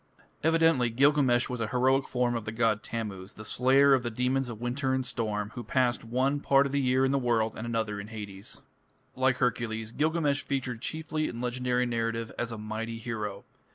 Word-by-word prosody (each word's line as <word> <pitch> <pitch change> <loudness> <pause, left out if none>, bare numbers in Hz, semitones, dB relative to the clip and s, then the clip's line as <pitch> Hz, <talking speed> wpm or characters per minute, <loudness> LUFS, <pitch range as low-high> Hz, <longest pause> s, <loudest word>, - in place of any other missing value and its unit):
" - - -36
Evidently 160 -6 +4
Gilgamesh 130 0 +3
was 125 -2 -4
a 110 - 0
heroic 130 +3 +2
form 125 -1 0
of 115 -2 -3
the 110 - -3
god 110 -2 +1
Tammuz, 105 -5 -6
the 110 - -9
slayer 135 +4 +4
of 130 - +4
the 120 - -3
demons 125 +3 0
of 115 -3 -7
winter 130 +2 -1
and 130 -1 -1
storm, 105 -3 -2
who 120 - -6
passed 120 +2 +1
one 130 +5 0
part 140 -1 +4
of 140 - -2
the 140 0 +1
year 130 0 +3
in 135 - +1
the 140 - +2
world 115 -3 +1
and 115 - -5
another 110 -3 -2
in 100 - -7
Hades 105 -3 -7
(Chapter - - -19 0.5
VI). 130 - -10
Like 130 -1 +3
Hercules, 110 -3 -1
Gilgamesh 150 0 +1
figured 130 -4 -3
chiefly 155 +1 -2
in 115 - -6
legendary 125 0 0
narrative 115 -1 -2
as 120 -1 -2
a 115 - -5
mighty 110 +2 -4
hero. 105 -4 -4
120 Hz, 210 wpm, -29 LUFS, 115-130 Hz, 0.5 s, Evidently